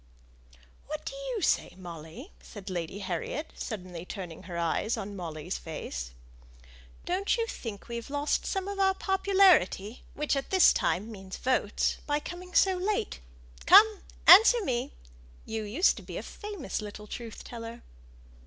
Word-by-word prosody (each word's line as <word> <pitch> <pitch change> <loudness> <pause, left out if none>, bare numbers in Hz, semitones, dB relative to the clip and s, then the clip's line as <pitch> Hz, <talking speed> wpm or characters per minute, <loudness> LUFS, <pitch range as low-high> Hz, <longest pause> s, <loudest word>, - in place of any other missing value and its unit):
"What 305 +1 -5
do - - -4
you - - -4
say, - - +1
Molly?" 175 - -9
said 200 -2 -9
Lady 175 +1 -4
Harriet, 200 - -4
suddenly 180 -6 -6
turning 180 -4 -7
her 170 - -4
eyes 170 +7 0
on 205 -1 -5
Molly's 170 -1 -5
face. 65 - -6 1.0
"Don't 380 +6 0
you 460 - +1
think 225 - -7
we've 235 0 -6
lost 285 +1 0
some 385 -1 -2
of 400 0 -4
our 385 -1 +3
popularity, 380 - +3
which 300 -1 0
at 275 - -3
this 375 -1 +6
time 210 +5 0
means 190 -3 -8
votes 250 -5 0
by 295 0 +1
coming 360 +3 -9
so 380 -1 +5
late. 395 - -1 0.5
Come, 430 -1 +8 0.3
answer 445 +3 +9
me! 240 -5 -1 0.5
you 220 0 -3
used 225 - +2
to - - -7
be - - -7
a - - -5
famous 410 - -5
little 210 0 -8
truth 230 +1 -8
teller." 230 0 -8
235 Hz, 150 wpm, -29 LUFS, -, 1.0 s, answer